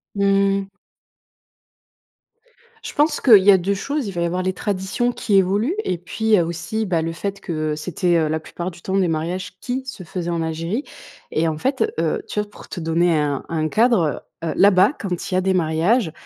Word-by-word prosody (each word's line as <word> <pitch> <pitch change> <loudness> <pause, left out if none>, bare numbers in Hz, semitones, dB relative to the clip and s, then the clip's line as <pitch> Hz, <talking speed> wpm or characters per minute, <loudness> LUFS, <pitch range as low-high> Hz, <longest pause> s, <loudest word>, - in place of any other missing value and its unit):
Mmh 195 0 +3
mh. 195 - -9 2.2
Je - - -6
pense 300 +2 +2
qu'il 215 -7 +7
y 200 - +7
a 190 - +6
2 190 +3 0
choses: 280 +5 -3
il - - -3
va 175 -2 -3
y - - +2
avoir 180 +2 -1
les 185 0 0
traditions 200 +5 -1
qui 215 -4 -1
évoluent, 200 - +2
et 180 - -1
puis, 215 +5 +1
heu, 175 - +3
aussi 170 +7 -3
bah, 170 -4 0
le 165 +1 -2
fait 200 +4 -4
que, 180 - -7 0.2
heu, - - -2
c'était, 175 +3 0
heu, 160 -1 +2
la 160 +1 -1
plupart 175 +3 -6
du 170 0 -15
temps 190 0 -1
des 190 -2 +3
mariages 175 +4 -3
qui 260 +1 -3
se 225 -8 -7
faisaient 175 +1 -4
en 170 -1 -1
Algérie. 165 - -2 0.5
Et 160 +2 +1
en 155 -1 -2
fait, 270 - 0
heu, 450 - 0
tu - - -3
vois, 210 0 -2
pour - - -14
te 185 - -6
donner 165 0 +2
un 145 -2 -1
un 155 -1 0
cadre, 230 +1 +3 0.4
heu 165 - -1
heu, - - -1
là-bas 195 +5 +5
quand 185 -2 -4
il - - -2
y - - +3
a 185 - +2
des 190 0 +1
mariages, 170 +5 +2
185 Hz, 220 wpm, -21 LUFS, 170-210 Hz, 2.2 s, qu'il